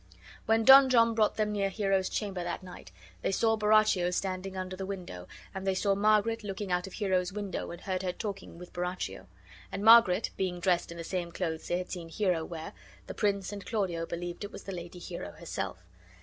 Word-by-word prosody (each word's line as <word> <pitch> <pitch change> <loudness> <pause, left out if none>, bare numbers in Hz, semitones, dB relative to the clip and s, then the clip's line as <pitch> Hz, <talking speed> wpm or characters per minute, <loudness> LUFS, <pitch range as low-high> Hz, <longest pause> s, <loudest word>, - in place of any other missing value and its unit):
When 225 +1 +3
Don 270 0 +10
John 230 -2 +5
brought 220 -2 +2
them 215 -1 0
near 200 -1 0
Hero's 195 -2 0
chamber 195 -4 -3
that 175 +1 -4
night, 180 - -11 0.3
they - - 0
saw 225 +3 +2
Borachio 215 -4 +3
standing 190 +1 -3
under 185 0 -4
the 190 - -5
window, 175 - -7 0.3
and 190 0 -5
they 190 - +2
saw 200 +1 +2
Margaret 215 +2 +2
looking 195 -1 -4
out 180 +1 0
of 190 - -11
Hero's 185 -3 0
window 205 -1 -4
and 170 - -8
heard 185 -1 -2
her 185 -1 -1
talking 195 -2 -6
with 180 0 -11
Borachio; 180 - -4 0.4
and 200 +2 -4
Margaret 225 -5 +7
being 180 -2 -1
dressed 175 0 +1
in 170 - -8
the 165 - -5
same 175 0 -3
clothes 165 -2 -3
they 175 - 0
had 180 0 -5
seen 170 -3 -6
Hero 180 -2 0
wear, 165 +4 -7 0.3
the - - -6
prince 200 -2 0
and 200 -1 -7
Claudio 180 -7 -2
believed 175 +2 -5
it 205 - -6
was - - -9
the 195 - -6
lady 175 -1 -7
Hero 170 - -7
herself. 85 - -5
190 Hz, 205 wpm, -30 LUFS, 175-210 Hz, 0.4 s, Don